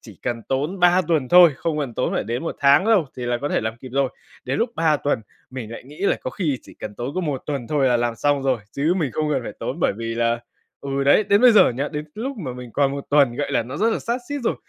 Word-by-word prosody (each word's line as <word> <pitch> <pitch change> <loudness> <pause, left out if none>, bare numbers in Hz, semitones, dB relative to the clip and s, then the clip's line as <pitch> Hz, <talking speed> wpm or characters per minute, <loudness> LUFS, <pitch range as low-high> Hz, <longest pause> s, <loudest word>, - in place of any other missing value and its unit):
chỉ - - -14
cần 120 -2 -3
tốn 145 +8 -1
3 180 +1 +5
tuần 150 -7 +1
thôi, 175 -3 +8
không 160 0 -2
cần 135 -5 -3
tốn - - -1
phải - - -1
đến 120 +5 -3
1 165 - -4
tháng 140 +6 +5
đâu 210 -9 +3
thì 125 - -6
là 120 0 0
có 145 - -2
thể - - 0
làm 110 +1 -3
kịp 130 +2 -11
rồi. 135 -1 +2 0.4
Đến 130 +2 -2
lúc 230 +1 0
3 160 -2 +3
tuần 145 -5 -1 0.3
mình 125 -4 -7
lại 115 - -9
nghĩ 145 +3 -14
là 200 - +2
có - - -4
khi 150 -10 -2
chỉ - - -15
cần 105 - -8
tốn 120 +6 -5
có 185 - 0
1 145 -6 -3
tuần 140 -5 -3
thôi 145 -3 +2
là 125 - +3
làm 120 -1 -1
xong 145 +2 +1
rồi, 130 -3 +1
chứ 150 +5 +1
mình 155 -7 -1
không 155 -1 -1
cần 135 -3 0
phải - - -6
tốn - - -4
bởi - - +2
vì 115 0 -4
là 115 0 0 0.4
ừ 140 0 -2
đấy, 140 +9 +5
đến 200 +1 +3
bây 250 -1 +7
giờ 215 - +6
nhá, 140 +4 -2
đến 150 -1 -5
cái 150 - -27
lúc 260 +4 -4
mà 150 -11 -5
mình 125 -1 -9
còn 140 -1 +2
1 140 0 -5
tuần, 140 -5 +4
gọi 145 - -2
là, - - +2
nó 130 +5 -7
rất 225 +7 +2
là - - 0
sát 235 +2 -2
sít 285 0 -3
rồi - - +1
140 Hz, 300 wpm, -22 LUFS, 125-165 Hz, 0.4 s, thôi